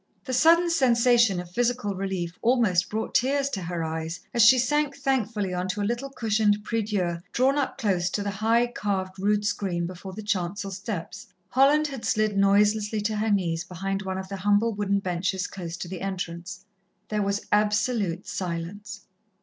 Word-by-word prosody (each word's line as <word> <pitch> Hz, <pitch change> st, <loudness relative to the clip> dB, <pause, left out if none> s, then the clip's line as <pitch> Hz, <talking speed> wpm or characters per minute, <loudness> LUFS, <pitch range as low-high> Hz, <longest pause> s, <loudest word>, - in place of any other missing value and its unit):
The 260 Hz, -, -4 dB
sudden 335 Hz, +6 st, +5 dB
sensation 240 Hz, -, +4 dB
of 175 Hz, -1 st, -8 dB
physical 240 Hz, -1 st, 0 dB
relief 185 Hz, -3 st, -3 dB
almost 225 Hz, -7 st, +2 dB
brought 220 Hz, +1 st, -3 dB
tears 275 Hz, +2 st, +2 dB
to 195 Hz, -, -3 dB
her 170 Hz, -1 st, -3 dB
eyes, 160 Hz, +1 st, -4 dB
as 235 Hz, -, +3 dB
she 255 Hz, +3 st, +8 dB
sank 285 Hz, +3 st, +1 dB
thankfully 225 Hz, -8 st, -1 dB
on 180 Hz, +1 st, -2 dB
to 205 Hz, +2 st, -2 dB
a -, -, 0 dB
little 240 Hz, +5 st, -2 dB
cushioned 215 Hz, -4 st, +1 dB
prieu 225 Hz, +1 st, -1 dB
dieu 185 Hz, -5 st, -1 dB
drawn 265 Hz, +3 st, +3 dB
up 275 Hz, -, -2 dB
close 185 Hz, -4 st, 0 dB
to 205 Hz, -, -2 dB
the 200 Hz, -, -2 dB
high, 225 Hz, +4 st, +2 dB
carved 195 Hz, -5 st, -3 dB
rood 205 Hz, +1 st, +1 dB
screen 180 Hz, -4 st, -1 dB
before 185 Hz, +2 st, -8 dB
the 215 Hz, +3 st, -7 dB
chancel 200 Hz, 0 st, -2 dB
steps. 190 Hz, -2 st, -6 dB, 0.2 s
Holland 285 Hz, +4 st, +4 dB
had 270 Hz, -5 st, -5 dB
slid 215 Hz, -1 st, +1 dB
noiselessly 210 Hz, +2 st, +3 dB
to 210 Hz, +1 st, -1 dB
her 220 Hz, +1 st, 0 dB
knees 175 Hz, -5 st, 0 dB
behind 195 Hz, +2 st, -4 dB
one 190 Hz, -1 st, -4 dB
of 190 Hz, 0 st, -5 dB
the 195 Hz, 0 st, -5 dB
humble 205 Hz, +4 st, +2 dB
wooden 200 Hz, -1 st, 0 dB
benches 185 Hz, 0 st, -1 dB
close 175 Hz, -4 st, -6 dB
to 180 Hz, -, -6 dB
the 180 Hz, 0 st, -7 dB
entrance. 180 Hz, -1 st, -5 dB, 0.4 s
There 210 Hz, -1 st, 0 dB
was 200 Hz, 0 st, -1 dB
absolute 210 Hz, -3 st, +1 dB
silence. 195 Hz, +4 st, -5 dB
205 Hz, 180 wpm, -26 LUFS, 185-230 Hz, 0.4 s, she